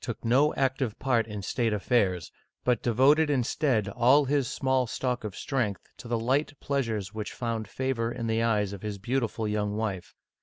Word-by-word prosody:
took 120 Hz, -1 st, -5 dB
no 135 Hz, +6 st, +4 dB
active 130 Hz, -4 st, 0 dB
part 120 Hz, -4 st, +1 dB
in 105 Hz, -2 st, -6 dB
state 115 Hz, +3 st, 0 dB
affairs, 95 Hz, -5 st, +1 dB, 0.3 s
but 125 Hz, -3 st, +2 dB
de 120 Hz, -, 0 dB
voted 145 Hz, +6 st, +4 dB
instead 125 Hz, -4 st, +1 dB
all 130 Hz, +6 st, +4 dB
his 140 Hz, -1 st, +1 dB
small 130 Hz, -1 st, 0 dB
stock 125 Hz, 0 st, -2 dB
of 105 Hz, -2 st, -5 dB
strength 120 Hz, -8 st, -2 dB
to -, -, -11 dB
the 120 Hz, 0 st, 0 dB
light 135 Hz, +5 st, 0 dB
pleasures 115 Hz, -8 st, -2 dB
which 105 Hz, -1 st, -4 dB
found 115 Hz, -3 st, -3 dB
favor 120 Hz, 0 st, -2 dB
in 115 Hz, -, -4 dB
the 115 Hz, 0 st, +1 dB
eyes 105 Hz, -4 st, +1 dB
of 100 Hz, -, -8 dB
his 105 Hz, -2 st, -4 dB
beautiful 115 Hz, 0 st, -1 dB
young 105 Hz, -1 st, -1 dB
wife. 105 Hz, -5 st, -3 dB
115 Hz, 185 wpm, -28 LUFS, 105-130 Hz, 0.3 s, no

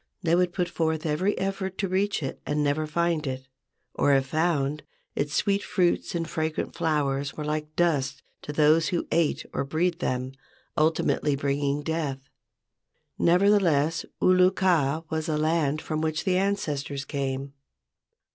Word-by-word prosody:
They 165 Hz, -1 st, +2 dB
would 180 Hz, 0 st, +3 dB
put 175 Hz, 0 st, -1 dB
forth 160 Hz, -2 st, -1 dB
every 175 Hz, +7 st, 0 dB
effort 195 Hz, -1 st, -3 dB
to 195 Hz, -, -1 dB
reach 190 Hz, -2 st, 0 dB
it 135 Hz, -, -5 dB
and 150 Hz, 0 st, 0 dB
never 145 Hz, +2 st, 0 dB
find 165 Hz, -1 st, 0 dB
it, 130 Hz, 0 st, -5 dB, 0.5 s
or, 140 Hz, -, +3 dB
if 135 Hz, -1 st, +2 dB
found, 150 Hz, -1 st, 0 dB, 0.3 s
its 145 Hz, +1 st, -1 dB
sweet 200 Hz, 0 st, +2 dB
fruits 180 Hz, -3 st, 0 dB
and 165 Hz, -1 st, -1 dB
fragrant 160 Hz, -1 st, -2 dB
flowers 145 Hz, -3 st, -1 dB
were 150 Hz, -, -5 dB
like 150 Hz, 0 st, -3 dB
dust 160 Hz, -6 st, 0 dB, 0.2 s
to -, -, -6 dB
those 155 Hz, +2 st, +4 dB
who 175 Hz, -, -1 dB
ate 165 Hz, -2 st, +1 dB
or -, -, -1 dB
breathed 165 Hz, +5 st, 0 dB
them, 130 Hz, -4 st, -2 dB, 0.4 s
ultimately 155 Hz, -2 st, +2 dB
bringing 140 Hz, +1 st, -1 dB
death. 145 Hz, -4 st, -3 dB, 0.9 s
Nevertheless, 170 Hz, -4 st, +3 dB, 0.2 s
Ulu 185 Hz, 0 st, +5 dB
kaa 165 Hz, -6 st, +1 dB
was 160 Hz, +1 st, -2 dB
a 155 Hz, -, +1 dB
land 155 Hz, -1 st, +1 dB
from 155 Hz, -1 st, -2 dB
which 160 Hz, 0 st, -1 dB
the 185 Hz, -2 st, +1 dB
ancestors 150 Hz, -8 st, -1 dB
came. 135 Hz, -1 st, -3 dB
155 Hz, 150 wpm, -26 LUFS, 145-175 Hz, 0.9 s, Ulu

